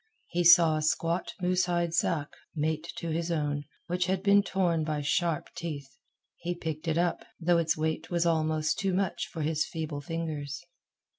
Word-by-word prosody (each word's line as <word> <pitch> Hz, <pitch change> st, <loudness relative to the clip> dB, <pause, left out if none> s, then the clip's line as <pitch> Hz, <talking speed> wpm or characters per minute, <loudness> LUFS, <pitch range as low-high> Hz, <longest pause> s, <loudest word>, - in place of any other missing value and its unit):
He 175 Hz, 0 st, 0 dB
saw 170 Hz, -2 st, +7 dB
a -, -, -1 dB
squat 165 Hz, +3 st, 0 dB
moose 180 Hz, 0 st, +2 dB
hide 175 Hz, -1 st, 0 dB
sack, 165 Hz, -3 st, +1 dB, 0.3 s
mate 155 Hz, +2 st, -1 dB
to 170 Hz, -2 st, -4 dB
his 165 Hz, +2 st, -1 dB
own, 145 Hz, -2 st, -1 dB, 0.2 s
which 180 Hz, 0 st, 0 dB
had 190 Hz, 0 st, 0 dB
been 200 Hz, 0 st, +6 dB
torn 180 Hz, -5 st, +1 dB
by 155 Hz, -1 st, -1 dB
sharp 155 Hz, +2 st, 0 dB
teeth. 140 Hz, -5 st, -6 dB, 0.4 s
He 175 Hz, 0 st, -3 dB
picked 160 Hz, -1 st, -5 dB
it 160 Hz, 0 st, +1 dB
up, 175 Hz, 0 st, +1 dB, 0.2 s
though 175 Hz, 0 st, +3 dB
its 160 Hz, -1 st, +1 dB
weight 160 Hz, 0 st, -2 dB
was 175 Hz, -1 st, +1 dB
almost 155 Hz, -2 st, +1 dB
too 195 Hz, -2 st, 0 dB
much 190 Hz, -2 st, -1 dB
for 160 Hz, -, -5 dB
his 155 Hz, 0 st, +1 dB
feeble 155 Hz, -3 st, -4 dB
fingers. 150 Hz, -2 st, -4 dB
165 Hz, 175 wpm, -29 LUFS, 155-175 Hz, 0.4 s, saw